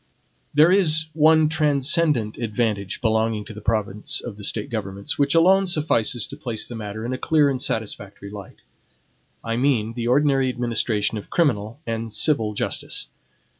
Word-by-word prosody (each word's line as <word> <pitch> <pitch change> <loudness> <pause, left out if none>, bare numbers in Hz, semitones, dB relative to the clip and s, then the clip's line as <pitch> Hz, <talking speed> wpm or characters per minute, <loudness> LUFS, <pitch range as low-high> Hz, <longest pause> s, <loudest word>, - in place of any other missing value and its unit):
There 155 +4 +5
is 160 -5 +3
one 160 0 +5
transcendant 150 -5 +1
advantage 105 -4 -2
belonging 110 -2 0
to - - -9
the 105 - -10
province 105 -1 -1
of 120 -4 -7
the 105 - -11
State 105 +2 -1
governments, 100 -1 -4
which 140 +2 +2
alone 190 +3 +5
suffices 125 - +1
to - - -7
place 120 -7 -4
the - - -8
matter 110 0 -6
in 125 - -3
a 130 - -4
clear 150 -3 +3
and 130 - -3
satisfactory 100 -2 -4
light, 100 -2 -11 0.8
I 115 0 -2
mean 120 -4 +1
the 120 0 -4
ordinary 135 0 +2
administration 115 -3 -1
of - - -13
criminal 120 -6 0
and 115 0 -4
civil 110 -2 +2
justice. - - -3
115 Hz, 160 wpm, -22 LUFS, 105-150 Hz, 0.8 s, There